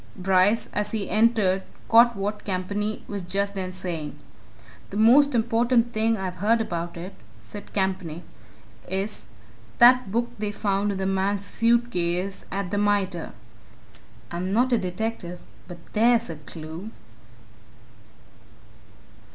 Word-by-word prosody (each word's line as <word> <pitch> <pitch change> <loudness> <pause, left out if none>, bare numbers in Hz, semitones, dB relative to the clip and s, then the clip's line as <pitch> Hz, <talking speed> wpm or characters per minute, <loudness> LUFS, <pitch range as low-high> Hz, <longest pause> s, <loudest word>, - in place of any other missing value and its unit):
Bryce, 190 +4 +2
as 210 +1 -2
he 210 -3 -3
entered, 215 -4 +3 0.3
caught 235 +1 +6
what 205 +2 -3
Campany 200 +3 -3
was 205 -1 -4
just 200 +3 -1
then 185 -2 -4
saying. 170 -6 -5 0.7
"The 200 - -5
most 260 +5 +6
important 235 +1 +2
thing 225 +1 +1
I've 185 -2 -4
heard 220 +5 +2
about 175 -6 -3
it," 180 +3 -7 0.3
said 155 - -11
Campany, 185 -4 -2 0.6
"is 190 - -3 0.5
that 245 -3 +6
book 235 +2 0
they 210 -1 -2
found 205 0 0
in - - -4
the 190 - -2
man's 195 +1 0
suit 235 +2 +2
case 180 +1 -2
at 195 -1 -3
the 205 - 0
Mitre. 200 -4 0 1.0
I'm 180 +2 -3
not 245 +4 +2
a 235 - +4
detective 185 -1 -4 0.3
but 175 -1 -9 0.2
there's 230 -1 +3
a 160 - -7
clue!" 160 +6 -9
200 Hz, 130 wpm, -25 LUFS, 185-225 Hz, 1.0 s, caught